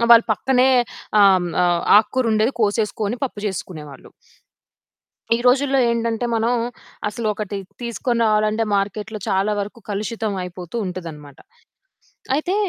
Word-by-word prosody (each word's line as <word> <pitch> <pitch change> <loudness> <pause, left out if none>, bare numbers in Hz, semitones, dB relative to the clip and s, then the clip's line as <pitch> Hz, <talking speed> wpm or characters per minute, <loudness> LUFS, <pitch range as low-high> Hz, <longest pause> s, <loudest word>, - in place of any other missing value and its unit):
ఆహ్, 235 - +2
వాళ్ళు 230 0 +8
పక్కనే 255 +4 +2 0.5
ఆహ్, 195 -1 +7
హ్మ్, 175 - -3 0.2
ఆహ్, 175 -1 +2 0.2
ఆకుకూరుండేది 225 +1 0
కోసేసుకోని 210 +1 0
పప్పు 250 - -6
జేసేసుకునేవాళ్ళు. 155 -7 -7 1.3
ఈ - - -1
రోజుల్లో 270 +2 +4
ఏంటంటే, 230 0 -1
మనం 230 +1 +1 0.6
అసలు 215 +2 -3
ఒకటి 210 -1 -4 0.2
తీసుకొని 235 0 -2
రావాలంటే 215 +1 +2
మార్కెట్‌లో 210 +2 -2
చాలా 195 +2 +1
వరకు 210 +4 -5
కలుషితం 215 +1 -2
అయిపోతూ 180 +1 -8
ఉంటదనమాట. 160 -6 -8 1.0
అయితే, 350 +6 -1
215 Hz, 120 wpm, -21 LUFS, 195-235 Hz, 1.3 s, వాళ్ళు